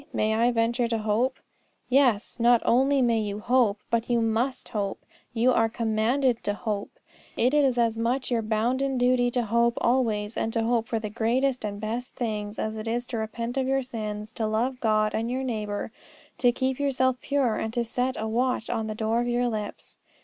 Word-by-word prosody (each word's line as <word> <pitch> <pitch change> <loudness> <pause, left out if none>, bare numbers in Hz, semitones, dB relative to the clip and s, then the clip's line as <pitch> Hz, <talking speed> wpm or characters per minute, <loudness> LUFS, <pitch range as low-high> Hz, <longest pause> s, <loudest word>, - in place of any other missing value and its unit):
May 215 0 +1
I 230 +2 +3
venture 235 +1 +1
to 230 -1 0
hope? 220 +5 0 0.5
Yes; 250 -5 +2
not 235 0 +4
only 265 +2 +3
may 230 -2 +2
you 205 -1 -3
hope, 230 -2 +2
but 230 0 0
you 240 -1 +3
must 230 +4 -1
hope. 200 -2 -3 0.3
You 240 +2 +3
are 225 -2 +3
commanded 235 +3 +1
to 205 - 0
hope. 210 -1 -4 0.4
It 250 +4 +2
is 275 -4 +3
as 230 -1 +1
much 250 +3 -1
your 235 -2 +2
bounden 245 +5 0
duty 245 0 +3
to 245 0 0
hope 235 +2 +2
always, 225 -4 +1
and 225 - -1
to 230 - +1
hope 230 -1 +1
for 230 - -1
the 215 -1 -4
greatest 245 +4 0
and 205 -1 -4
best 230 +4 -4
things, 210 -3 -3
as 220 0 -3
it 215 +1 -6
is 240 +2 -1
to 235 - -3
repent 230 +3 -4
of 260 -1 +1
your 270 0 +1
sins, 215 -3 -5
to 220 - -2
love 240 +4 -1
God 215 -2 +2
and 225 +2 -1
your 260 +2 -2
neighbour, 215 -4 -3 0.5
to 245 - +4
keep 260 +1 -1
yourself 260 -2 +1
pure, 275 -5 +1
and 220 - -2
to 240 -1 0
set 250 +3 -1
a 220 - -2
watch 240 +1 0
on 225 -2 -2
the 215 - -4
door 220 +2 0
of 240 - -2
your 245 0 +1
lips. 215 -2 -6
235 Hz, 200 wpm, -26 LUFS, 220-250 Hz, 0.5 s, not